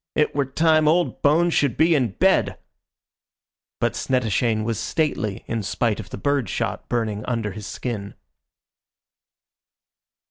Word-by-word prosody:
"It 150 - +2
were 140 -2 0
time 155 +2 +3
old 170 +3 +1
bones 165 +4 +3
should 140 -5 +1
be 165 +1 +4
in 125 -9 +1
bed." - - +2 1.2
But - - +1
Snettishane 115 -3 0
was 115 -1 -2
stately 120 -10 -1
in 115 -1 -2
spite 110 +2 -1
of 110 - -8
the - - -7
bird 140 -7 0
shot - - -3
burning 110 -3 -1
under 115 -4 -2
his 105 +1 -8
skin. 105 -5 -5
120 Hz, 135 wpm, -23 LUFS, 110-150 Hz, 1.2 s, be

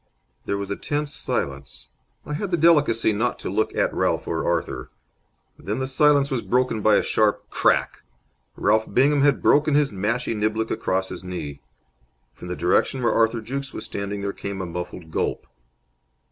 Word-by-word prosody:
There 100 - 0
was 100 0 -5
a - - 0
tense 145 +4 -3
silence. 65 -3 -4 0.4
I 150 - -5
had 190 +6 -3
the 175 - +1
delicacy 145 -9 +4
not 115 +4 0
to - - -5
look - - 0
at - - +1
Ralph - - 0
or - - -1
Arthur. - - -2 0.7
Then 100 +7 -3
the 130 - -1
silence 140 +1 +3
was 130 -3 0
broken 125 -3 0
by 105 0 +5
a - - +3
sharp 105 -1 +1
crack. - - +1 0.5
Ralph 110 0 +1
Bingham 140 +3 +3
had 140 -1 +3
broken 150 0 +4
his 145 -3 +3
mashie 105 +5 -1
niblick 110 +1 -1
across 95 0 -1
his - - -7
knee. 80 -6 -6 0.7
From 90 - -11
the 90 - -3
direction 125 +9 +1
where 120 - +3
Arthur 115 0 +2
Jukes 135 +4 -5
was - - -5
standing 100 0 -4
there 100 0 -3
came 100 -1 -6
a 95 - -3
muffled 90 -1 -7
gulp. - - -2
110 Hz, 175 wpm, -23 LUFS, 100-140 Hz, 0.7 s, by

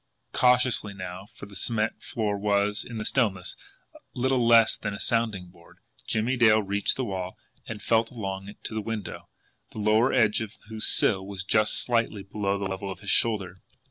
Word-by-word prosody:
Cautiously 125 -4 +3
now, 95 +1 -7
for - - -9
the 100 0 -14
cement 110 +3 -1
flooring 105 -3 -2
was, 105 0 +1
in 115 - -8
the 105 - -3
stillness, 100 -8 0 0.6
little 130 0 +1
less 115 -1 +6
than 105 -2 -4
a - - -8
sounding 110 -6 -1
board, 85 -1 -20 0.3
Jimmie 115 +4 0
Dale 110 -3 +5
reached 100 +1 0
the 130 - -2
wall 95 -3 -4 0.3
and 105 -1 -7
felt 115 0 +2
along 95 -5 -5
it 100 - -14
to - - -4
the 110 - -2
window, 105 -2 -6 0.4
the - - -10
lower 110 +4 +3
edge 110 -4 +3
of 110 -1 -5 0.2
whose 110 -1 0
sill 95 -3 +3
was 95 -1 -6
just 110 +2 +2
slightly 115 -4 0
below 100 0 -2
the 100 - -3
level 95 +1 -4
of 95 0 -7
his 100 - -1
shoulder. 100 -5 +1
105 Hz, 185 wpm, -26 LUFS, 100-115 Hz, 0.6 s, less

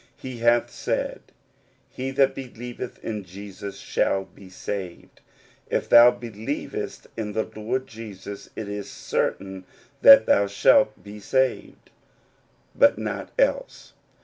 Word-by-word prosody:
He 130 -2 -8
hath 120 0 +3
said, - - -3 0.7
"He 130 +1 -4
that 135 0 +3
believeth 125 -1 -7
in 105 -2 -4
Jesus 100 +2 -9
shall 95 0 0
be 95 -1 -16
saved." 95 -1 -7 0.5
If - - -1
thou 120 +1 +9
believest 115 -3 -5
in 105 -2 -4
the 110 - 0
Lord 115 +5 -2
Jesus 100 -3 -9
Christ, - - -28
it 110 - -4
is 105 -1 -5
cer - - -1
tain 95 -1 -9 0.4
that 275 0 +9
thou 100 0 +3
shalt 100 - +3
be 105 +1 -10
saved; 130 +5 -1 0.8
but - - +4
not - - -4
else. - - -1
110 Hz, 130 wpm, -24 LUFS, 100-125 Hz, 0.8 s, thou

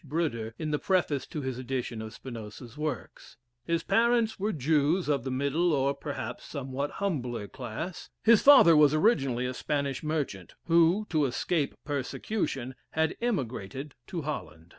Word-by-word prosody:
Bruder, 130 -8 -2
in 155 -2 -3
the 150 - 0
preface 175 -7 +1
to 150 - -5
his 130 -1 -3
edition 125 -3 -3
of 110 0 -6
Spinoza's 115 -1 -9
works. 150 -7 -5 0.3
His 170 0 +1
parents 230 -2 +2
were 210 +3 0
Jews 155 +3 +2
of 140 -5 +1
the 130 - -3
middle, 140 +7 +1
or, 140 0 +2
perhaps, - - -5
somewhat 140 +1 -4
humbler 125 - -2
class. 130 - -6
His 225 -1 +6
father 265 - +8
was 150 -1 +6
originally 135 - +2
a 125 - -2
Spanish 140 -1 -2
merchant, 145 - -3
who, 170 +5 +4
to 155 -3 +3
escape 145 +4 -1
persecution, 135 - -2 0.2
had 160 +1 +1
emigrated 135 - -3
to 170 -4 -4
Holland. 80 - -6
145 Hz, 150 wpm, -29 LUFS, 130-165 Hz, 0.3 s, father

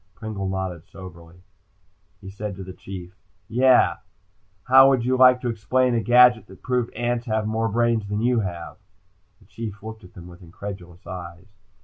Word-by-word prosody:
Pringle 105 -3 -5
nodded 95 -3 -5
soberly. 85 -3 -12 0.8
"Yeah," - - -40
he 95 - -9
said 100 0 -6
to 95 - -8
the 95 0 -9
Chief, 95 0 -10 1.5
"how 135 +1 +7
would 130 -3 +1
you 130 +1 +1
like 125 -1 +6
to 125 - -3
explain 125 +3 0
a 115 - +1
gadget 120 -2 +5
that 95 - -16
proved 125 -2 -1
ants 120 0 -2
have 110 -1 -1
more 110 +1 -1
brains 115 -1 0
than 105 +1 -2
you 120 0 +2
have?" 85 -5 -5 0.6
The - - -23
Chief 105 0 -8
looked 110 -1 -9
at 90 - -16
them 85 - -11
with 90 0 -14
incredulous 90 0 -10
eyes. 90 0 -9
105 Hz, 170 wpm, -23 LUFS, 95-120 Hz, 1.5 s, how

